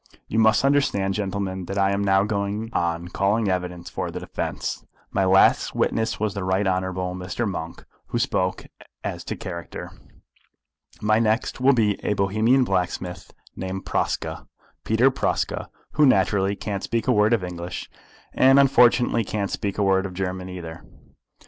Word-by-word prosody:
You 110 - 0
must 110 +3 +4
understand, 135 -9 +2
gentlemen, 95 -2 -3
that 100 - -5
I 100 0 +3
am 100 0 0
now 95 0 +3
going 105 +2 -2
on 85 0 -1
calling 100 +3 +1
evidence 90 -2 -3
for - - -4
the - - -5
defence. - - -4 0.3
My 95 - +1
last 95 +1 +4
witness 110 0 0
was 105 -2 -1
the 100 - -4
Right 95 +2 +1
Honourable 95 -1 -1
Mr. 90 +5 -3
Monk, 85 -4 -6 0.2
who - - -2
spoke 90 0 -1 0.4
as - - -4
to - - -3
character. 85 -3 -7 1.1
My 110 +1 +3
next 115 +3 0
will 135 +2 +5
be 105 -5 +1
a - - +1
Bohemian 110 +7 +3
blacksmith 90 -4 -2 0.2
named 95 0 -5
Praska, - - -2 0.4
Peter 120 +5 +3
Praska, - - -1 0.2
who 150 -1 +4
naturally 100 -3 +2
can't 100 -1 -4
speak 115 -1 -2
a - - +4
word 105 0 +3
of 115 -5 +2
English, 90 0 -6 0.5
and 135 +1 +6
unfortunately 125 -3 +4
can't 100 -1 -3
speak 100 -2 -3
a 105 - +1
word 95 0 +2
of 90 - -11
German 95 0 -3
either. 80 -3 -8
100 Hz, 160 wpm, -24 LUFS, 95-110 Hz, 1.1 s, and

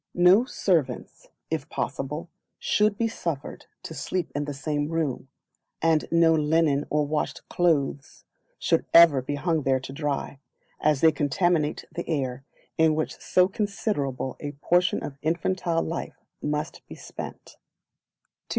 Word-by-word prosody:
No 180 +7 +6
Servants, 160 - -1 0.2
if - - -2
possible, 150 +5 -3 0.3
should 210 -1 +2
be 230 - +1
suffered 165 -10 -5 0.2
to - - -7
sleep 180 -3 -3
in 145 +1 -2
the 145 - -4
same 145 +1 -2
room, 155 -6 -2 0.5
and 160 -1 +2
no 165 -1 +5
linen 150 -2 +2
or 150 0 +1
washed 150 +1 -3
clothes 145 -5 0 0.3
should - - +1
ever 165 -5 +8
be 145 +3 -3
hung 160 +2 0
there 130 -1 +2
to 130 +1 -8
dry, 140 -1 -3 0.4
as 150 -3 +2
they 160 - +7
contaminate 155 +1 0
the 175 - -6
air 135 -4 -2 0.4
in 160 -1 +5
which 155 - -3
so 180 0 +3
considerable 195 - -2
a 145 -1 -5
portion 175 +4 +1
of 135 -1 -7
infantile 170 +1 0
life 165 +1 -5 0.2
must 150 0 -3
be - - -9
spent. - - -9
155 Hz, 140 wpm, -26 LUFS, 145-170 Hz, 0.5 s, ever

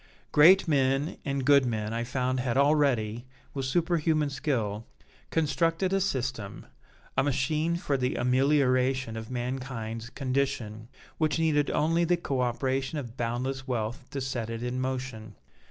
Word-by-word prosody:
Great 170 +6 +7
men 135 0 +1
and 140 -3 -2
good 140 -1 +6
men 110 -3 -2
I 115 +1 -1
found 130 +1 -1
had 125 -1 -1
already, 130 -6 +2 0.3
with 135 -2 -3
superhuman 160 -1 +1
skill, 115 -7 -2 0.4
constructed 165 +4 +1
a 195 - +2
system, 130 - -3 0.5
a - - +3
machine 150 +4 0
for 145 -5 -1
the 125 0 -1
amelioration 130 -1 +2
of 110 0 -6
mankind's 120 -2 -4
condition, 130 -5 -2 0.3
which 155 -2 +1
needed 155 -3 +2
only 165 +3 +2
the 175 +1 +2
co 135 -6 -2
operation 130 +3 -1
of 120 -5 -6
boundless 130 +3 -3
wealth 120 0 -2
to 140 - -4
set 125 -3 -3
it 115 +1 -4
in 125 +1 -2
motion. 125 -5 -4
130 Hz, 140 wpm, -28 LUFS, 120-145 Hz, 0.5 s, Great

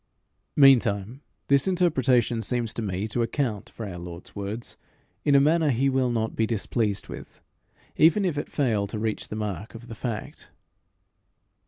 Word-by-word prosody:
Meantime 125 -4 +4 0.3
this 140 +2 +3
interpretation 130 - +2
seems 120 -1 0
to - - -3
me 100 0 -2
to 120 +2 -1
account 115 -3 -2
for 115 - -7
our 90 -3 -7
Lord's 85 0 -10
words 100 +3 -5 0.5
in 145 - +3
a - - +8
manner 155 +2 +3
he 135 +2 +2
will 130 -1 +1
not 110 -2 -1
be 110 - +1
displeased 110 -2 -1
with - - -10 0.6
even 170 +6 +5
if 175 -5 0
it 145 - -4
fail 110 -8 +1
to 105 - -6
reach 110 0 -2
the - - -6
mark 105 0 -5
of 115 +1 -10
the - - -6
fact. 115 -1 -6
115 Hz, 165 wpm, -26 LUFS, 105-135 Hz, 0.6 s, a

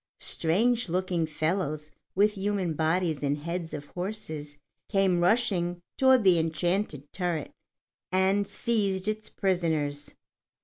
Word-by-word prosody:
Strange 225 +7 +1
looking 180 -2 0
fellows 155 -1 -1 0.2
with 205 +2 +4
human 195 -4 -1
bodies 160 0 0
and 145 0 0
heads 170 +2 -4
of 145 -1 -6
horses 160 -7 -5 0.3
came 195 -3 +3
rushing 175 -3 +2 0.2
toward 260 -3 +5
the 180 -3 +5
enchanted 165 -1 0
turret, 175 -5 -2 0.6
and 190 +2 +2
seized 200 -6 0
its 215 0 -2
prisoners. 160 -7 -1
180 Hz, 115 wpm, -28 LUFS, 160-200 Hz, 0.6 s, toward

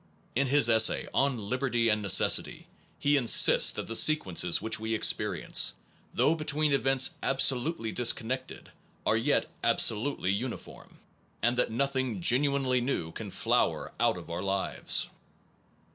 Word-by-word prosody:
In 140 +3 0
his 140 -1 +4
essay 110 -1 +2
on 135 -2 0
liberty 120 +2 -2
and 105 -1 0
necessity, 95 -2 +2 0.3
he 145 0 +1
insists 120 -4 +5
that - - -6
the 115 - -5
sequences 95 - +2
which 110 +2 -2
we 110 +1 -3
experience, - - 0 0.4
though 155 - +1
between 155 -2 -1
events 135 -1 +2
absolutely 135 -2 0
disconnected, 125 +2 -2 0.3
are 110 - +1
yet 120 +6 0 0.2
absolutely 110 -3 +1
uniform, 115 +5 -7 0.5
and 120 +1 +1
that 125 - 0
nothing 130 -2 -3
genuinely 130 +4 0
new 120 -10 -3
can - - -8
flower - - -1
out - - +1
of - - -11
our 85 +1 -5
lives. 100 0 0
125 Hz, 130 wpm, -28 LUFS, 110-140 Hz, 0.5 s, insists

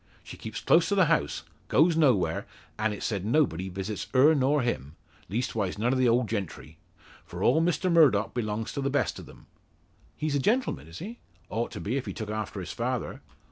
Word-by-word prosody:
She - - -9
keeps 110 -1 -7
close 165 - +4
to 200 - +1
the 190 -3 +5
house; 110 - 0 0.2
goes 160 +3 +4
nowhere; 120 - +2 0.3
an' 110 0 +1
it's 105 - -5
said 100 -5 -2
nobody 105 - +1
visits 95 +3 -5
her 145 +5 +7
nor 140 -1 +2
him 75 - -3 0.3
leastwise 110 -3 -2
none 120 +5 +1
o' - - +1
the 130 -2 +3
old 120 0 +2
gentry. 95 -7 -5 0.4
For - - -6
all 160 - +4
Mr 175 +2 +1
Murdock 140 -11 +4
belongs 110 -2 -3
to 140 - -3
the 135 - 0
best 145 +1 0
of - - -11
them." - - -15 0.7
"He's 155 -1 -1
a - - +2
gentleman, 205 - 0
is 80 +2 -10
he?" 225 +6 -8 0.3
"Ought 115 +2 -1
to - - -6
be 120 +7 -2
if 135 - -4
he - - -4
took 110 -2 -5
after 110 -4 -4
his - - -6
father." - - -3
120 Hz, 205 wpm, -28 LUFS, 105-150 Hz, 0.7 s, her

